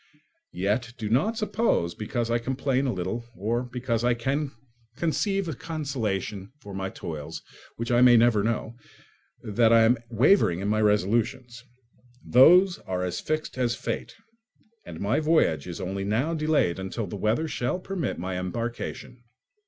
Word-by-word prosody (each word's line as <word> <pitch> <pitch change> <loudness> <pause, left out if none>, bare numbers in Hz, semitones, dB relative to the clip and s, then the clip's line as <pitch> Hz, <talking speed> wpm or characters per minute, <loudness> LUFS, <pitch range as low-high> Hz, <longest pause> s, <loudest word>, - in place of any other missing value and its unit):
Yet 115 +6 -1
do 110 -3 -4
not 210 - +2
suppose, 215 - 0
because 115 +2 -3
I 120 - +2
complain 135 +2 -1
a - - +1
little 95 +5 -3
or 115 +5 -1
because 125 -2 -2
I 120 0 +3
can 135 +4 -1 0.4
conceive 195 +4 0
a 160 - -2
consolation 120 - -4
for 105 -7 -10
my 95 0 -3
toils 75 -5 -7 0.3
which 115 +1 -4
I 120 0 +4
may 125 -1 +7
never 115 -2 +4
know, 115 +1 -2 0.7
that 110 +2 +2
I 115 0 +7
am 115 +1 +3
wavering 115 - +3
in 100 +2 -2
my 110 +1 +1
resolutions. 115 +4 0 0.6
Those 180 +9 +6
are 90 -1 -3
as 90 -1 -2
fixed 155 -4 -3
as 120 -2 +1
fate, 115 - -5 0.7
and 80 - -8
my 100 +8 +1
voyage 155 - +2
is 85 0 -6
only 95 +1 -3
now 115 +11 0
delayed 155 - +1
until 95 +4 -4
the 100 - -7
weather 110 +11 0
shall 125 +1 -2
permit 185 -7 -3
my 90 +1 -3
embarkation. 115 +5 -5
120 Hz, 155 wpm, -26 LUFS, 100-135 Hz, 0.7 s, may